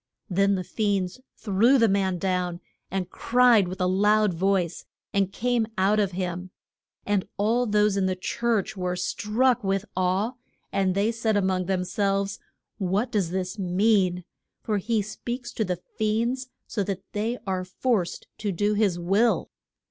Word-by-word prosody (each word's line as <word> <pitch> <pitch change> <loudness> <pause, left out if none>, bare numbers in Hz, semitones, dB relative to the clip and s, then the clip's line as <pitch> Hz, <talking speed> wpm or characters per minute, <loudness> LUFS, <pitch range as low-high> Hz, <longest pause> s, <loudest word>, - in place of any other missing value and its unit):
Then 195 +2 +3
the 185 - -2
fiends 200 +1 -1 0.2
threw 225 +6 +3
the 230 -2 +5
man 190 -2 +1
down, 180 -1 -1 0.3
and 190 -1 -3
cried 240 -5 +4
with 185 +2 -6
a 180 - +2
loud 205 +2 +3
voice, 185 -1 0 0.3
and 195 -1 +1
came 240 +1 0
out 200 +3 +3
of 200 -3 +1
him. 180 0 -3 0.6
And 205 -2 0
all 230 +4 +2
those 210 -1 +3
in 190 -1 +2
the 185 - 0
church 215 +2 -1
were 180 -1 -2
struck 215 +7 +1
with 195 +1 0
awe, 185 +5 +1 0.4
and 190 -2 +1
they 205 +3 +2
said 225 -2 0
a - - +3
mong 185 -1 0
them 190 -1 0
selves, 195 +1 0 0.4
What 200 +6 0
does 200 -6 +1
this 185 +2 -3
mean? 185 -1 +2 0.4
for 210 -2 0
he 215 +1 0
speaks 240 +4 -5
to 220 - 0
the 180 -3 -3 0.2
fiends 235 +4 0 0.2
so 205 - -2
that 195 -1 -4
they 225 +4 -1
are 185 -2 -1
forced 185 0 -1
to 210 -2 -1
do 205 +4 +1
his 205 -4 +2
will! 195 +7 +1
200 Hz, 165 wpm, -26 LUFS, 185-220 Hz, 0.6 s, the